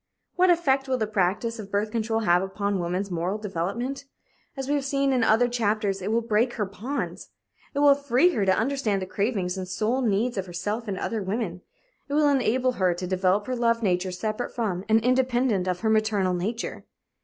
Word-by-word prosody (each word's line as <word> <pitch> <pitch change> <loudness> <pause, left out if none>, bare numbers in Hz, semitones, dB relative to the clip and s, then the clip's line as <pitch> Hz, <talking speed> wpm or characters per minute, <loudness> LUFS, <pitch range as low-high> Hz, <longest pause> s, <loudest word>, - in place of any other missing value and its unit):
What 365 +1 +4
effect 275 -6 +2
will 260 -1 +1
the 220 - 0
practice 210 +3 -1
of 205 -2 -7
birth 205 +1 -1
control 225 -1 -1
have 175 -4 +3
upon 200 +1 -2
woman's 180 +3 -2
moral 175 +4 -1
development? 215 +8 -3 0.5
As 270 -1 -4
we 285 - +1
have 285 -1 0
seen 275 0 +1
in 250 -3 +2
other 225 +2 +4
chapters, 215 -4 0
it 200 +3 -2
will 230 +1 +2
break 230 +2 +1
her 210 - -1
bonds. 230 +9 -5 0.5
It - - 0
will 290 -1 +7
free 280 +3 +3
her 220 - 0
to 190 -1 +3
understand 225 -6 0
the - - -3
cravings 195 -2 -1
and 185 - -5
soul 220 +7 0
needs 225 0 0
of 190 - -4
herself 205 +6 -3
and 195 -2 -3
other 220 +3 -2
women. 190 -2 -3 0.5
It - - -3
will 300 -1 +4
enable 255 -2 +2
her 185 -7 +1
to 180 +1 -5
develop 185 +2 +1
her 255 - -2
love 230 -1 +1
nature 185 -1 +1
separate 215 +6 -4
from 195 -6 -2
and 220 +1 +5
independent 250 -6 +2
of 180 -1 -1
her 220 - +1
maternal 215 -4 +2
nature. 210 +7 -3
215 Hz, 200 wpm, -25 LUFS, 190-250 Hz, 0.5 s, will